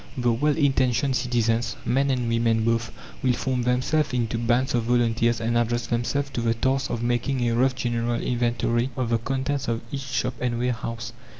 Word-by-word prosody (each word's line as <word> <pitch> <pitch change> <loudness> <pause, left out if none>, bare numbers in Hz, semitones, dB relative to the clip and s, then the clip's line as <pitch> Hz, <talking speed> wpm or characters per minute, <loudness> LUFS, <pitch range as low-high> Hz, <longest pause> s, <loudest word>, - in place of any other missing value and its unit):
The 120 -2 +2
well 145 +6 +1
intentioned 135 -2 +2
citizens, 120 -2 0
men 135 +2 +2
and 125 -3 0
women 115 -1 +1
both, 115 0 0 0.3
will 125 - +2
form 130 +1 -1
themselves 130 +4 +1
into 115 -2 -1
bands 120 +2 +1
of 120 -2 +1
volunteers 115 -1 +2
and 115 +1 -1
address 120 +1 +1
themselves 135 +4 -1
to 120 - -2
the 115 0 +1
task 135 +3 0
of 120 - -3
making 120 +1 0
a 115 - +1
rough 130 +2 +2
general 120 -1 -1
inventory 120 0 0
of 125 -3 -1
the 115 - +2
contents 135 +3 -2
of 115 -1 -1
each 140 - -3
shop 125 -1 -2
and 120 -1 0
warehouse. 115 -1 -3
120 Hz, 185 wpm, -25 LUFS, 115-130 Hz, 0.3 s, The